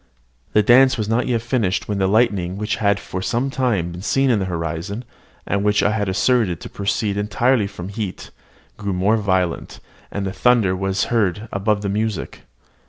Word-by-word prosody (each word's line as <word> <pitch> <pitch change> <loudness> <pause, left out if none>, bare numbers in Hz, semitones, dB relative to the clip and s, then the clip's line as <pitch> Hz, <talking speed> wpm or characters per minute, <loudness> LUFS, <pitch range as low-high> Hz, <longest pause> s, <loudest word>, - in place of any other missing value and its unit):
The 105 - +4
dance 130 +4 +5
was 110 -2 -2
not 115 +3 +1
yet 115 -3 0
finished 115 -6 0
when 105 -2 -2
the 95 - +2
lightning 100 -4 +1
which 105 +1 -2
had 100 -1 +2
for 90 - -6
some 120 +7 -1
time 115 -11 0
been 90 +1 -8
seen 135 +5 +2
in 110 - +2
the 95 - -1
horizon, 85 +6 -4 0.4
and 100 +1 -1
which 105 0 +2
I 100 - +3
had 105 -3 -1
asserted 100 -3 +1
to - - -8
proceed 100 0 -1
entirely 110 +2 +1
from 95 -2 -8
heat, 100 -2 -5 0.5
grew 100 -2 -3
more 100 +5 +2
violent; 95 -5 -1 0.3
and 100 -1 -4
the 95 - -3
thunder 115 -7 +3
was 95 +1 -1
heard 105 -1 0
above 100 +1 0
the - - -1
music. 105 -2 -3
105 Hz, 185 wpm, -21 LUFS, 95-115 Hz, 0.5 s, dance